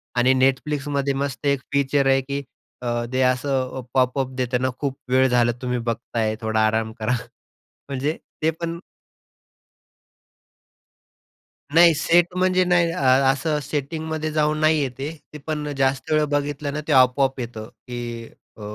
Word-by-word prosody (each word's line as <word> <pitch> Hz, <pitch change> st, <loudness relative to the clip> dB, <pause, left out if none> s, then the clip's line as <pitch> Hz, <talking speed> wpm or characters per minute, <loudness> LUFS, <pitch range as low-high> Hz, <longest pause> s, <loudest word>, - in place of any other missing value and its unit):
आणि 125 Hz, +2 st, +4 dB
Netflixमध्ये 140 Hz, +1 st, 0 dB
मस्त 140 Hz, 0 st, -3 dB
1 140 Hz, -1 st, +2 dB
फीचर 140 Hz, 0 st, +2 dB
आहे 135 Hz, 0 st, +4 dB
की 140 Hz, +1 st, -4 dB, 0.4 s
अ, -, -, -3 dB, 0.3 s
ते 130 Hz, -, +1 dB
असं 130 Hz, 0 st, 0 dB
पॉपअप 130 Hz, 0 st, +1 dB
देतं 125 Hz, -1 st, -1 dB
ना, 130 Hz, -, +1 dB
खूप 140 Hz, -2 st, -2 dB
वेळ 130 Hz, +1 st, +4 dB
झाला 120 Hz, -1 st, +3 dB
तुम्ही 125 Hz, -1 st, -1 dB
बघताय, 115 Hz, -1 st, -2 dB
थोडा 110 Hz, -1 st, 0 dB
आराम 110 Hz, 0 st, -1 dB
करा. 110 Hz, +3 st, 0 dB, 0.8 s
म्हणजे 140 Hz, +4 st, -2 dB, 0.2 s
ते 160 Hz, -, +3 dB
पण 170 Hz, 0 st, -3 dB, 3.0 s
नाही. 170 Hz, 0 st, +8 dB
सेट 170 Hz, +3 st, +3 dB
म्हणजे 185 Hz, 0 st, +3 dB
नाही 175 Hz, -1 st, +3 dB
अ, 175 Hz, -, -4 dB, 0.3 s
असं 150 Hz, +2 st, -1 dB
सेटिंगमध्ये 155 Hz, +3 st, -3 dB
जाऊन 150 Hz, 0 st, +1 dB
नाही 155 Hz, 0 st, +4 dB
आहे -, -, -3 dB
ते. 150 Hz, +2 st, -7 dB
पण 150 Hz, -1 st, -2 dB
जास्त 135 Hz, +2 st, 0 dB
वेळ 155 Hz, 0 st, +3 dB
बघितलं 145 Hz, 0 st, -1 dB
ना, 150 Hz, -, -3 dB
ते -, -, -1 dB
आपोआप 130 Hz, +1 st, +4 dB
येतं, 115 Hz, -3 st, -6 dB, 0.2 s
की 120 Hz, -1 st, -6 dB, 0.3 s
अ, -, -, -12 dB
135 Hz, 145 wpm, -23 LUFS, 125-150 Hz, 3.0 s, नाही